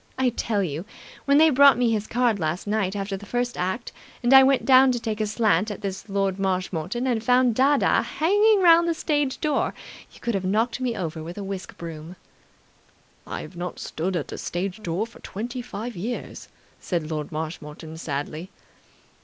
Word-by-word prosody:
I 260 -1 +3
tell 220 -3 -1
you, 160 -1 -3 0.4
when 280 0 +4
they 315 +1 +6
brought 280 0 +7
me 245 -2 +2
his 215 -1 -1
card 240 -3 +1
last 160 +2 -2
night 205 -2 -1
after 195 0 -3
the 195 - -9
first 245 +2 -1
act 190 +7 -3 0.3
and 240 +2 +4
I 265 - +11
went 265 0 +3
down 260 0 +7
to 240 - -2
take 220 -2 -3
a 215 - 0
slant 210 -2 +2
at 205 - -6
this 195 +1 -5
Lord 195 -1 0
Marshmoreton 185 +3 -2
and 235 -4 0
found 250 0 +4
dadda 275 +4 +3 0.2
hanging 410 +5 +4
round 340 0 +6
the 335 - +1
stage 290 -4 -1
door, 300 -2 0 0.4
you - - -16
could 235 - -2
have 195 -2 -1
knocked 225 +7 0
me 245 -2 -1
over 160 -2 -4
with 170 +4 -8
a 205 - -4
whisk 195 -1 -6
broom." 165 +1 -8 1.1
"I - - -5
have - - -10
not 175 +1 -5
stood 180 +4 -3
at 165 - -3
the - - -6
stage 185 +4 -4
door 180 +3 -2
for 230 - -16
twenty 240 +5 -5
five 240 -1 -6
years," 220 +8 -5 0.3
said 165 -4 -3
Lord 150 -2 -4
Marshmoreton 155 0 -6
sadly. 155 +3 -4
210 Hz, 190 wpm, -24 LUFS, 180-250 Hz, 1.1 s, I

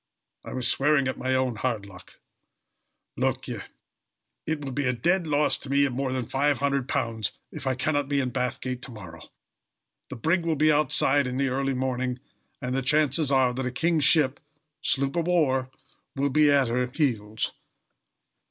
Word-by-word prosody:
I - - -8
was 125 -2 +1
swearing 140 +1 +3
at 130 - -3
my 130 0 0
own 130 -3 0
hard 110 -3 -2
luck. 90 -2 -14 1.0
Look - - -1
ye, - - -4 0.9
it 160 -1 -1
will 135 - -4
be 140 +1 -1
a 125 - +2
dead 175 +8 +1
loss 150 0 +2
to 140 - -7
me 140 +1 +3
of 135 - -2
more 135 +1 -2
than 130 -2 -2
£500 135 -5 0 0.2
if 135 - -7
I 130 - +1
can't 145 +1 -1
be 140 -1 +1
in 130 -2 -1
Bathgate 125 0 -3
to 130 - -6
morrow. 85 -8 -11 0.8
The - - -6
brig 165 +9 +1
will 165 -1 0
be 155 +1 +4
outside 145 -2 +3
in 125 0 -3
the 135 0 +1
early 135 +1 -1
morning, 125 -1 -2 0.4
and 125 -1 -3
the 135 - 0
chances 150 +1 +2
are 130 -2 +3
that 130 +2 -3
a - - -2
king's 160 +4 +1
ship 145 -4 +4 0.4
sloop 135 0 0
of 170 -1 0
war 135 -7 +2 0.5
will 140 0 0
be 150 +1 +4
at 140 -3 +4
her 125 +2 0
heels. 120 -7 -1
135 Hz, 180 wpm, -26 LUFS, 125-145 Hz, 1.0 s, be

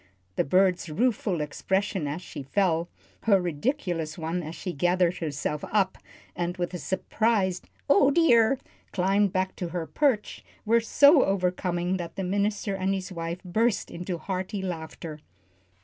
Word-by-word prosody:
The - - +2
bird's 180 +1 +2
rueful 200 -1 0
expression 190 +3 -1
as 155 +5 -4
she 145 - -7
fell, 170 +3 +1 0.4
her 200 -3 +5
ridiculous 175 - -2
one 165 +2 -2
as 160 0 -7
she 180 - -5
gathered 175 +3 +2
herself 150 -1 -3
up, 195 -3 +1 0.4
and 175 +1 -2
with 175 0 -2
a 180 - -4
surprised 190 +3 0 0.2
"Oh, 280 -1 +5
dear!" 270 -6 +4 0.3
climbed 195 +1 +2
back 185 0 -1
to 180 - -3
her 170 -1 -3
perch, 230 - 0 0.2
were 230 +2 +4
so 285 +5 +6
overcoming 180 -1 0
that 170 -2 -6
the 195 - -3
minister 200 +2 0
and 195 0 0
his 190 0 -5
wife 170 0 -5
burst 220 +5 0
into 175 +1 -4
hearty 190 +3 -4
laughter. 160 -3 -6
185 Hz, 150 wpm, -27 LUFS, 170-205 Hz, 0.4 s, so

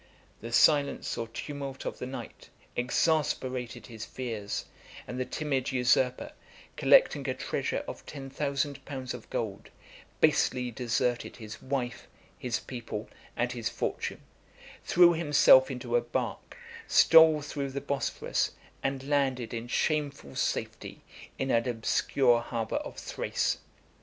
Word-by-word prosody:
The 115 - -7
silence 145 +3 +3
or 115 - -3
tumult 135 +3 -6
of - - -4
the 125 - -4
night 130 -4 -8 0.3
exasperated 125 -2 0
his 110 -2 -8
fears; 110 -6 -4 0.4
and 125 - -6
the 130 - 0
timid 145 -2 -1
usurper, 125 0 +2 0.4
collecting - - +4
a - - -1
treasure - - -2
of - - -7
ten 135 -2 -7
thousand 140 0 -2
pounds 130 -3 -5
of 125 -3 -10
gold, 105 -4 -4 0.5
basely 125 -1 +2
deserted 120 0 -1
his 110 -3 -9
wife, 130 -2 -3 0.3
his 125 -2 -1
people, 115 -4 -6 0.3
and 120 0 0
his 115 -2 -2
fortune; - - -3 0.6
threw 175 0 +6
himself 475 - +6
into - - -3
a 485 - +4
bark; - - -4 0.3
stole 160 -2 +7
through 145 -1 -3
the 135 +1 -3
Bosphorus; 140 0 -1 0.3
and 135 0 -2
landed 135 -5 0
in 115 0 -4
shameful 140 - -1
safety - - -3 0.3
in 135 0 -1
an 115 +2 +2
obscure 120 +1 +2
harbor 115 -2 -2
of - - -6
Thrace. - - -1
130 Hz, 130 wpm, -29 LUFS, 120-145 Hz, 0.6 s, stole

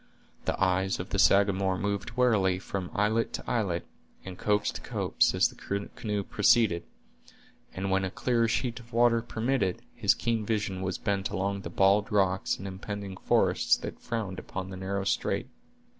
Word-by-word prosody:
The - - -1
eyes 95 0 +1
of 90 - -5
the 100 - -1
Sagamore 100 -1 +4
moved 100 +4 -2
warily 105 -7 +3
from 95 -1 -5
islet 110 +3 +1
to - - -5
islet, 100 -8 -1 0.4
and 95 -1 -7
copse 105 +2 +1
to - - -8
copse, - - +1
as - - +4
the 100 0 -5
canoe 105 -2 -2
proceeded; 105 -4 +3 0.9
and, 95 +1 -3
when 95 0 +2
a 95 - -1
clearer 115 +3 +1
sheet 120 +1 -1
of 120 0 -16
water 115 0 +4
permitted, 115 -4 -1
his - - +3
keen 115 -2 -1
vision 105 -3 -2
was 95 -1 -2
bent 100 -2 -1
along 100 +1 -2
the 85 - -6
bald 100 +3 +3
rocks 95 -2 +1
and 95 - -7
impending 100 0 -6
forests - - +2
that - - -7
frowned 105 -5 -4
upon 95 0 -6
the - - -6
narrow 95 +1 -2
strait. 95 - -1
100 Hz, 170 wpm, -28 LUFS, 95-110 Hz, 0.9 s, Sagamore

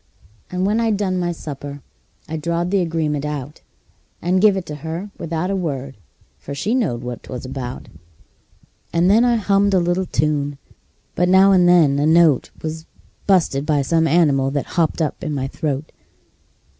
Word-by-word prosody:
And 180 +1 -1
when 210 +3 +1
I'd 225 -3 +1
done 185 -3 -1
my 175 -1 -1
supper 145 -3 -7 0.4
I 160 - -5
drawed 170 +3 -2
the 200 -1 +2
agreement 160 -4 -1
out, 150 -1 -5 0.6
And 180 +2 +1
give 205 -2 +5
it 185 - -4
to 150 -1 -7
her 165 +7 -6
without 170 +2 -2
a - - 0
word, 140 -7 -3 0.4
for 140 - -7
she 205 - -1
knowed 160 - 0
what 125 -1 -6
'twas 125 -1 -7
about; 130 -1 -6 1.0
And 170 +3 +3
then 225 +3 +5
I 240 -1 +3
hummed 200 -2 +2
a - - +5
little 175 +2 0
tune, 145 -1 -1 0.6
but 180 +1 +1
now 190 +1 +6
and 180 -2 +5
then 155 -6 +4
a 145 - +2
note 160 -4 +4
Was 160 0 -5 0.4
bu'sted 170 -8 +2
by 150 -2 +1
some 160 +3 +2
animal 145 -5 +3
that 140 0 -2
hopped 165 -1 +1
up 155 - -4
in 155 -3 -2
my 135 -1 -2
throat. 145 0 -3
165 Hz, 175 wpm, -20 LUFS, 145-185 Hz, 1.0 s, now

